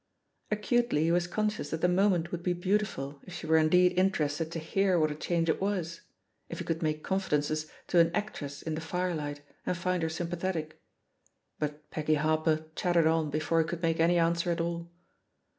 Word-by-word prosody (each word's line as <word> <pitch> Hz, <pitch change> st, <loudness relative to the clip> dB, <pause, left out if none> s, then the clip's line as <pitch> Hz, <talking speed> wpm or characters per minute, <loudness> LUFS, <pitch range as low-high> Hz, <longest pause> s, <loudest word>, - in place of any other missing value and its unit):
Acutely 215 Hz, -4 st, +1 dB
he 165 Hz, -, +2 dB
was 175 Hz, 0 st, +2 dB
conscious 215 Hz, +3 st, -1 dB
that; 160 Hz, -, -3 dB
the -, -, +4 dB
moment 180 Hz, -2 st, +2 dB
would 175 Hz, -, -3 dB
be 180 Hz, +1 st, 0 dB
beautiful 175 Hz, -7 st, -1 dB
if 180 Hz, -, -8 dB
she 175 Hz, -, -6 dB
were 160 Hz, 0 st, +4 dB
indeed 180 Hz, +3 st, +5 dB
interested 160 Hz, -4 st, +1 dB
to 170 Hz, -, -4 dB
hear 185 Hz, +3 st, +1 dB
what 155 Hz, -1 st, +2 dB
a -, -, -4 dB
change 165 Hz, +2 st, 0 dB
it 160 Hz, -, +1 dB
was 180 Hz, -4 st, -2 dB, 0.2 s
— -, -, -25 dB
^if -, -, -4 dB
he -, -, -4 dB
could 165 Hz, 0 st, -2 dB
make 155 Hz, -1 st, -1 dB
confidences 155 Hz, -5 st, 0 dB, 0.2 s
to 175 Hz, -, +3 dB
an 165 Hz, 0 st, +6 dB
actress 145 Hz, -9 st, -4 dB
in 160 Hz, -, -3 dB
the 155 Hz, -, -3 dB
firelight 160 Hz, -4 st, -3 dB, 0.2 s
and 180 Hz, -, -1 dB
find 180 Hz, 0 st, 0 dB
her 160 Hz, -, 0 dB
sympathetic. 170 Hz, -1 st, -3 dB, 0.8 s
But 150 Hz, 0 st, -4 dB
Peggy 155 Hz, 0 st, +1 dB
Harper 155 Hz, +1 st, +1 dB
chattered 175 Hz, -2 st, +2 dB
on 160 Hz, -1 st, +2 dB
before 155 Hz, +2 st, +1 dB
he 160 Hz, -, -2 dB
could 170 Hz, +1 st, -5 dB
make 165 Hz, -1 st, +1 dB
any 170 Hz, +2 st, +4 dB
answer 170 Hz, +1 st, +2 dB
at 170 Hz, -, 0 dB
all. 170 Hz, 0 st, -3 dB
165 Hz, 195 wpm, -30 LUFS, 155-180 Hz, 0.8 s, an